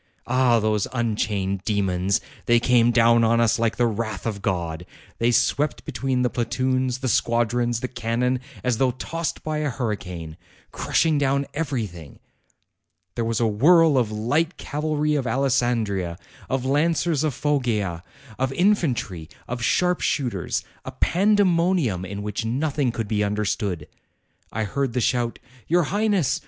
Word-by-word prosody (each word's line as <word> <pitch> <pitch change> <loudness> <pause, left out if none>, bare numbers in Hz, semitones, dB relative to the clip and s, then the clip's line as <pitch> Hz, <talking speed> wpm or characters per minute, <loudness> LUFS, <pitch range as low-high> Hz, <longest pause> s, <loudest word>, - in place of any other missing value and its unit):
Ah! 125 -1 +3
those 105 -2 0
unchained 105 -5 -1
demons! 95 -3 0 0.3
They 120 0 +5
came 120 -1 +4
down 115 0 +4
on 115 +1 +3
us 115 +1 +2
like 115 -1 +1
the 120 - +3
wrath 110 -2 -3
of 105 -3 -3
God. 85 -4 -2 0.4
They 115 - +3
swept 145 +4 +1
between 130 -2 -1
the 125 - +2
platoons, 130 +2 -1
the - - +1
squadrons, 120 +1 +1
the 130 - -2
cannon, 125 +1 -1 0.2
as 125 -3 0
though 130 - +3
tossed 165 +5 -4
by 155 -1 -2
a 150 -1 0
hurricane, 90 - -4 0.3
crushing 160 -3 +1
down 140 0 +1
everything. 110 - -4 1.0
There 115 - -2
was 115 0 -1
a 120 - +2
whirl 155 +9 +5
of 120 -5 +1
light 145 +11 0
cavalry 150 0 -1
of 140 -4 0
Alessandria, 115 -9 0 0.3
of 130 -1 -1
lancers 160 +2 +1
of 150 -5 -1
Foggia, 115 - 0 0.4
of 130 0 0
infantry, 135 - 0 0.2
of 125 0 -4
sharp 180 +7 +2
shooters, 120 - -1 0.2
a - - -7
pandemonium 175 - +2
in 100 +2 -6
which 105 +2 -3
nothing 135 +3 0
could 115 -2 -4
be 105 0 0
understood. 100 -5 -2 0.6
I 110 - -2
heard 135 +3 -2
the 125 - 0
shout, 120 -1 0 0.3
'Your 175 +1 +3
Highness 200 - +1
120 Hz, 145 wpm, -23 LUFS, 105-140 Hz, 1.0 s, They